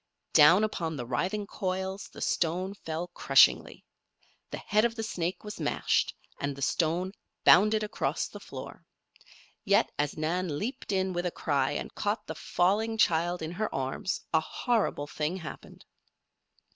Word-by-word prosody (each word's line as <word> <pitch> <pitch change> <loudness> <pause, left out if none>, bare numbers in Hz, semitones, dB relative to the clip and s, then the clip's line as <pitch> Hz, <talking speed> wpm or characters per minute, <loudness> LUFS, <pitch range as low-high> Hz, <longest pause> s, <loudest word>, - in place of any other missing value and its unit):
Down 170 +8 +7
upon 165 -7 -2
the 120 - -4
writhing 185 - -1
coils 190 -1 -3
the - - -11
stone 180 +3 0
fell 170 -2 -5
crushingly. 175 - +4 0.6
The - - -5
head 210 +1 +1
of 235 -1 +1
the 225 - -3
snake 180 -4 -3
was 210 -3 -7
mashed, 150 - +1 0.2
and 140 -1 -2
the 140 - -5
stone 170 +6 0 0.3
bounded 215 +4 +6
across 210 - -1
the - - -10
floor. - - -10 0.8
Yet, 200 +1 +3
as 145 -1 -1
Nan 160 0 -1
leaped 230 - -4
in 190 -1 0
with 175 0 -1
a - - -2
cry 140 -5 0
and - - -5
caught 210 +1 -2
the 160 - -5
falling 210 +8 0
child 175 -2 +2
in 160 - -4
her 215 +4 -2
arms, 135 +7 -2
a 160 - +6
horrible 220 -4 -1
thing 155 +4 -3
happened. 165 -4 -10
180 Hz, 155 wpm, -29 LUFS, 160-205 Hz, 0.8 s, Down